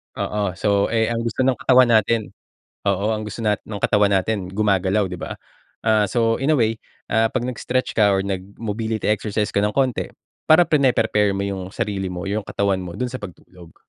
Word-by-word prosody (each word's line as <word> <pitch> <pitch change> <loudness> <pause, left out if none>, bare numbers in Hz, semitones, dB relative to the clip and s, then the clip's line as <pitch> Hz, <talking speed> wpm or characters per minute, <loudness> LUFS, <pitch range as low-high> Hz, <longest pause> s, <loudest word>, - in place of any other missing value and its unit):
Oo, 100 -3 -2
so 100 0 +1
eh, 110 0 +1
ang 115 - -1
gusto 115 +2 -1
ng 130 -2 +2
katawan 125 0 +5
natin 110 0 +2 0.6
oo 100 +3 +1
ang 110 - -4
gusto 105 - -7
natin 105 -2 0
ng 105 -2 -6
katawan 105 -1 +3
natin 100 +2 +1
gumagalaw 100 0 +1
'di 90 - -6
ba? - - -5 0.5
Ah, 110 -2 +3
so, 115 +3 +1
in 135 +4 +1
a - - +3
way 115 -1 +1 0.3
ah, 110 0 +3
'pag 115 +2 -2
nag-stretch 125 +1 -2
ka 105 -2 +4
or 95 - +1
nag-mobility 105 +3 -3
exercise 105 0 -1
ka - - -1
ng 105 +1 +1
konti, 130 -4 +1 0.4
para 160 +3 +7
prine-prepare 115 - +2
mo 100 - -2
yung 100 -1 -3
sarili 100 -4 -2
mo, 90 -1 -5
yung 100 +1 -2
katawan 100 -1 0
mo 90 -2 -7
dun 125 +4 -3
sa 130 - -5
pagtulog 90 -3 -12
105 Hz, 195 wpm, -21 LUFS, 100-115 Hz, 0.6 s, para